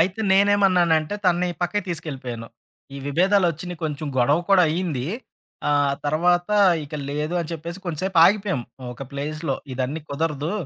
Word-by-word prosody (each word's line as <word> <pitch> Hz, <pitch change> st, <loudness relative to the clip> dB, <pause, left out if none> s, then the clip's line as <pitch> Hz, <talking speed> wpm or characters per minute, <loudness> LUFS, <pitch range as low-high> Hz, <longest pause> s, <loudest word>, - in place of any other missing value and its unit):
అయితే 185 Hz, +5 st, +1 dB
నేనేమన్నానంటే 190 Hz, -4 st, +3 dB
తనని 180 Hz, 0 st, +2 dB
పక్కకి 195 Hz, +2 st, -1 dB
తీసుకెళ్ళిపోయాను. 130 Hz, -9 st, -5 dB, 0.5 s
ఈ -, -, -6 dB
విభేదాలొచ్చినయి, 175 Hz, +1 st, +1 dB
కొంచెం 150 Hz, 0 st, -3 dB
గొడవ 140 Hz, +6 st, +4 dB
కూడా 195 Hz, -2 st, +6 dB
అయింది. 155 Hz, -6 st, -2 dB, 0.6 s
ఆహ్, 145 Hz, -1 st, +2 dB
తర్వాత 175 Hz, +4 st, +2 dB, 0.4 s
ఇక 145 Hz, -, -10 dB, 0.2 s
లేదు 150 Hz, +4 st, -2 dB
అని 165 Hz, -, -5 dB
చెప్పేసి 170 Hz, +3 st, -6 dB
కొంసేపు 175 Hz, +2 st, -1 dB
ఆగిపోయాం. 195 Hz, -, +2 dB, 0.3 s
ఒక 130 Hz, -, -9 dB
ప్లేస్‌లో 150 Hz, 0 st, -3 dB, 0.2 s
ఇదన్నీ 135 Hz, +5 st, -2 dB
కుదరదు. 150 Hz, +2 st, -2 dB
165 Hz, 130 wpm, -23 LUFS, 145-180 Hz, 0.6 s, కూడా